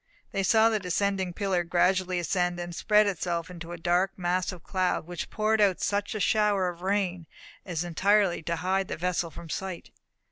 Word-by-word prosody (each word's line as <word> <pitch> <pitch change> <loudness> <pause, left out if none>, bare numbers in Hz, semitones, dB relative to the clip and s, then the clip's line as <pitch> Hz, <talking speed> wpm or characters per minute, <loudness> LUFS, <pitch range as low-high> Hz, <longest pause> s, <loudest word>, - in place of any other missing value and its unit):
They 195 - -1
saw 220 +3 +5
the 220 -1 0
descending 190 0 -1
pillar 185 -1 0
gradually 180 +1 +1
ascend, 175 +1 0
and 175 -1 -5
spread 210 +3 +4
itself 175 -3 -2
into 170 -1 -8
a 175 - -5
dark 175 +3 +1
mass 180 +1 0
of 175 -3 -11
cloud, 185 -4 0
which 175 0 -6
poured 215 0 +1
out 195 -3 +3
such 205 +1 -1
a - - -2
shower 205 -1 +2
of 175 -1 -9
rain 185 -3 -1 0.4
as 170 -2 -2
entirely 195 +2 +2
to 170 +1 -2
hide 185 +3 0
the - - -4
vessel 175 0 -1
from 165 +2 -10
sight. 185 +2 -5
185 Hz, 185 wpm, -27 LUFS, 175-200 Hz, 0.4 s, saw